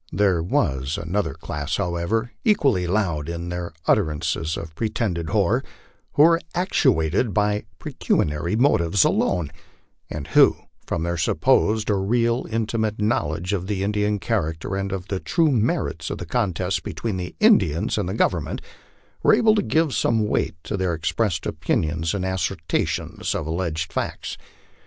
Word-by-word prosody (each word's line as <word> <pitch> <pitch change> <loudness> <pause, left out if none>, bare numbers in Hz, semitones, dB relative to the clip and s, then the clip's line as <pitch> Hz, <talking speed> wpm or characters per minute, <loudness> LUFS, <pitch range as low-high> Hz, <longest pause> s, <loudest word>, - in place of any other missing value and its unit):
There 95 -5 +2
was 65 -4 0
another 95 +5 -2
class, 75 +2 -4
however, 90 +8 -1
equally 135 - +2
loud 85 -6 0
in 85 +1 -4
their 90 -1 -4
utterances 80 -3 0
of 80 -1 -7
pretended 90 -4 -2
horror, - - +2 0.5
who 145 - +5
were 165 +1 +5
actuated 125 - +2
by 105 0 +1
pecuniary 75 +6 -1
motives 100 -7 +3
alone, 85 -5 +1 0.6
and 75 -2 -5
who, - - +6 0.3
from 80 - -1
their 85 0 -1
supposed 105 +6 +2
or 100 -2 +1
real 115 +3 +1
intimate 110 -1 -1
knowl 105 -8 +1
edge 90 +4 -3
of 95 0 -2
Indian 105 +1 0
character 95 -5 -2
and 95 0 -2
of 95 -1 -4
the 95 - -1
true 165 - +2
merits 115 - 0
of - - -4
the 90 - -6
contest 95 -2 -1
between 110 -5 -4
the 90 -1 -5
In 215 -1 +7
dians 80 0 -1
and 95 -3 -2
the 95 - -3
Government, 85 -8 0 0.6
were - - +6
able 225 -1 +4
to 210 - +2
give 160 -6 +1
some 110 -2 +1
weight 80 -6 0
to 105 - -3
their 90 -3 0
expressed 85 +3 -1
opinions 80 +3 -1
and 95 -2 -2
assertions 95 0 -2
of 80 - -2
alleged 80 -1 -2
facts. - - -3
95 Hz, 150 wpm, -23 LUFS, 85-110 Hz, 0.6 s, In